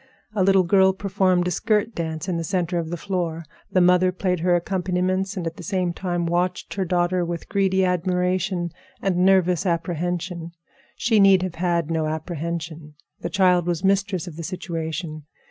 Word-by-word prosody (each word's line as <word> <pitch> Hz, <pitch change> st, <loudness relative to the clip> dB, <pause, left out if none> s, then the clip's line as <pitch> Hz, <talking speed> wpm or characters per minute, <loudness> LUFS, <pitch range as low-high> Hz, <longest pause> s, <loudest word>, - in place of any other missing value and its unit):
A 210 Hz, -, 0 dB
little 195 Hz, 0 st, +5 dB
girl 190 Hz, +1 st, +4 dB
performed 190 Hz, -2 st, +1 dB
a -, -, 0 dB
skirt 215 Hz, +5 st, +1 dB
dance 160 Hz, 0 st, -4 dB
in 180 Hz, -2 st, -1 dB
the 165 Hz, -, -2 dB
center 175 Hz, +1 st, -1 dB
of 165 Hz, -1 st, -4 dB
the 175 Hz, -, -3 dB
floor. 170 Hz, -4 st, -3 dB, 0.3 s
The 185 Hz, -, +3 dB
mother 180 Hz, +1 st, +4 dB
played 180 Hz, -1 st, -1 dB
her 175 Hz, +1 st, +3 dB
accompaniments 185 Hz, +2 st, -1 dB
and 175 Hz, -, -3 dB
at 165 Hz, 0 st, -4 dB
the -, -, -9 dB
same 185 Hz, -2 st, -1 dB
time 175 Hz, -1 st, -2 dB
watched 175 Hz, +2 st, -1 dB
her 195 Hz, -1 st, -1 dB
daughter 175 Hz, 0 st, +1 dB
with 170 Hz, -1 st, -4 dB
greedy 190 Hz, -1 st, +2 dB
admiration 180 Hz, 0 st, 0 dB, 0.3 s
and 190 Hz, -2 st, 0 dB
nervous 180 Hz, -2 st, +3 dB
apprehension. 170 Hz, -1 st, -2 dB, 0.4 s
She 220 Hz, -1 st, +2 dB
need 195 Hz, -2 st, +6 dB
have 185 Hz, -3 st, -3 dB
had 170 Hz, -2 st, 0 dB
no 160 Hz, -1 st, 0 dB
apprehension. 160 Hz, -1 st, -5 dB, 0.2 s
The -, -, -4 dB
child 180 Hz, -3 st, +3 dB
was 175 Hz, 0 st, -1 dB
mistress 195 Hz, -2 st, +1 dB
of 165 Hz, -4 st, -9 dB
the 165 Hz, -, -5 dB
situation. 160 Hz, -3 st, -5 dB
180 Hz, 175 wpm, -23 LUFS, 170-190 Hz, 0.4 s, need